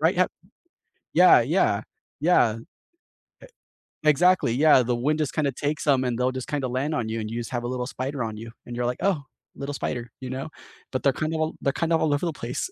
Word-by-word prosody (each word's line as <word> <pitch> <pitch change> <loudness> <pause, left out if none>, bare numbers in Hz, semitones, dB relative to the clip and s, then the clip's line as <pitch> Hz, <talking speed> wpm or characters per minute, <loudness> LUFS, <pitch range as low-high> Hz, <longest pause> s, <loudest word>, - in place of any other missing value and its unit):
right 165 +3 +3
yu 185 - +4 0.9
yeah - - +7
yeah - - +2 0.4
yeah, 140 -9 +3
e 115 - -14 1.4
exactly, 155 -2 +4
yeah, 140 0 +5
the 120 +1 0
wind 150 +6 0
just 150 -3 -1
kind 155 -3 +1
of 135 - -3
takes 145 +2 -2
'em, 135 -3 +4
and 125 -2 -1
they'll 125 +1 +1
just 130 -1 -6
kind 145 -2 -2
of 130 - -2
land 140 +5 -1
on 115 -5 -2
you, 115 +1 -2
and 110 -1 -4
you 115 +2 -3
just 115 - -5
have 120 -2 -2
a - - -2
little 125 0 -2
spider 135 0 -3
on 110 -1 -5
you, 115 +2 -8 0.2
and 120 - -7
you're 120 0 -1
like, 125 +1 -1
"Oh, 185 -8 +1 0.3
little 140 +1 -5
spider," 120 -3 -4
you 130 - -5
know? 130 +3 -4 0.4
But 130 - -2
they're 140 - +4
kinda 155 +4 -2
all 155 0 -1
they're 140 - +1
kind 165 +2 -1
of 165 - +3
all 155 -2 +2
over 145 +5 0
the 165 - -1
place, 125 - -4
135 Hz, 240 wpm, -25 LUFS, 120-155 Hz, 1.4 s, yeah